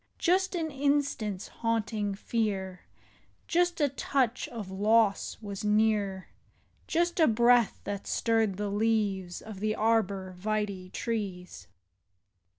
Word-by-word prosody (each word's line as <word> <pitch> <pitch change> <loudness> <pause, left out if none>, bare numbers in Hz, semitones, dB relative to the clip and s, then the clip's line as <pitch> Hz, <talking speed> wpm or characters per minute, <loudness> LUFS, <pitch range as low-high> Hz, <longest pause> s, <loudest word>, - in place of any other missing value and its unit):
Just 370 +2 +2
an 320 -2 -2
instant's 275 -8 0
haunting 220 -3 -1
fear. 195 -4 -2 0.6
Just 350 0 +1
a 295 - +4
touch 260 -2 0
of 215 -6 -7
loss 210 +1 +2
was 200 -1 -5
near, 210 -3 +1 0.6
Just 345 +1 0
a 320 - +6
breath 235 0 +4
that 200 -1 -5
stirred 225 -4 +1
the 205 0 -2
leaves 205 -4 0
Of 215 -3 -9
the 215 +1 0
arbor 200 -4 +1
vitse 200 -1 -3
trees. 185 - -4
215 Hz, 115 wpm, -29 LUFS, 195-235 Hz, 0.6 s, a